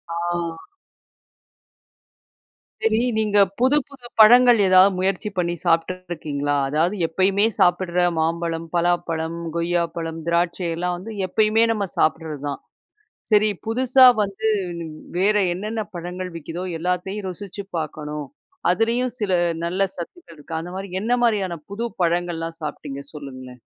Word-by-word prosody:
ஆ. 170 -1 -3 2.2
சரி. 220 0 +3 0.2
நீங்க 210 -1 +1 0.2
புது 260 +4 +4
புது 270 -4 -12
பழங்கள் 240 +2 +8
ஏதாவது 185 +1 +6
முயற்சி 190 +2 0
பண்ணி 175 -1 0
சாப்பிட்டுட்ருக்கீங்களா? 165 -4 -1
அதாவது 160 +7 +1
எப்பயுமே 190 +5 +2
சாப்பிடுற 180 0 +2 0.2
மாம்பழம், 165 +1 -1
பலாப்பழம், 170 -1 0 0.2
கொய்யாப்பழம், 170 -1 -1
திராட்சை 170 +1 0
எல்லாம் 180 +1 -1
வந்து 215 +5 -8
எப்பயுமே 215 +3 +3
நம்ம 205 -3 -1
சாப்பிடுறது 155 -2 0
தான். 140 - -4 0.7
"சரி, 215 0 +5 0.2
புதுசா 255 +3 +5 0.2
வந்து 205 +2 -2 0.7
வேற 205 +3 +3 0.2
என்னென்ன 215 +4 -3
பழங்கள் 180 +1 -5
விக்குதோ, 165 +3 -6 0.2
எல்லாத்தையும் 180 +3 -2
ருசிச்சு 200 +2 -6
பார்க்கணும். 150 -1 -5 0.5
அதுலயும் 235 +5 0
சில 205 -3 0 0.3
நல்ல 175 +3 -2 0.2
சத்துக்கள் 170 - -9
இருக்கு." 160 +2 -5
அந்த 175 +2 -7
மாரி, 195 0 -6
என்ன 230 +3 -1
மாரியான 195 -7 0
புது 220 +4 -3 0.2
பழங்கள்லாம் 170 -1 -1
சாப்பிட்டீங்க? 145 -2 -6
சொல்லுங்களேன். 130 -4 -9
175 Hz, 115 wpm, -22 LUFS, 165-210 Hz, 2.2 s, பழங்கள்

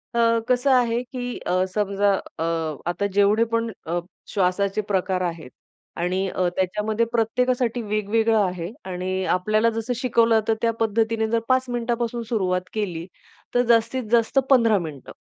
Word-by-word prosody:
अ, 230 -1 +3
कसं 250 +2 +3
आहे, 240 -2 +3
की 245 -1 -5
अ, 185 +1 0
समजा 200 0 +1 0.3
अ, - - 0 0.5
आता 175 +3 -1
जेवढे 205 +2 +4
पण 230 0 0 0.2
अ, 175 +1 0 0.3
श्वासाचे 195 +1 0
प्रकार 190 -1 0
आहेत 165 -6 -7 0.5
आणि 185 +2 0
अ, 185 0 0
त्याच्यामध्ये 210 +4 0
प्रत्येकासाठी 245 +1 +1
वेगवेगळं 215 +1 +1
आहे 180 -2 -4 0.2
आणि 185 +1 -2
आपल्याला 215 +5 +2
जसं 225 +2 -3
शिकवलं 230 -2 +3
तर 225 - +3
त्या 230 - +2
पद्धतीने 225 0 +1
जर 230 +1 +1
5 255 0 +3
मिनिटापासून 240 0 -2
सुरुवात 185 -6 0
केली 180 -6 -3 0.5
तर 245 - +5
जास्तीत 235 +2 +2
जास्त 235 +3 +2
15 230 -5 +5
मिनिटं. 155 -6 -8
220 Hz, 145 wpm, -23 LUFS, 190-235 Hz, 0.5 s, तर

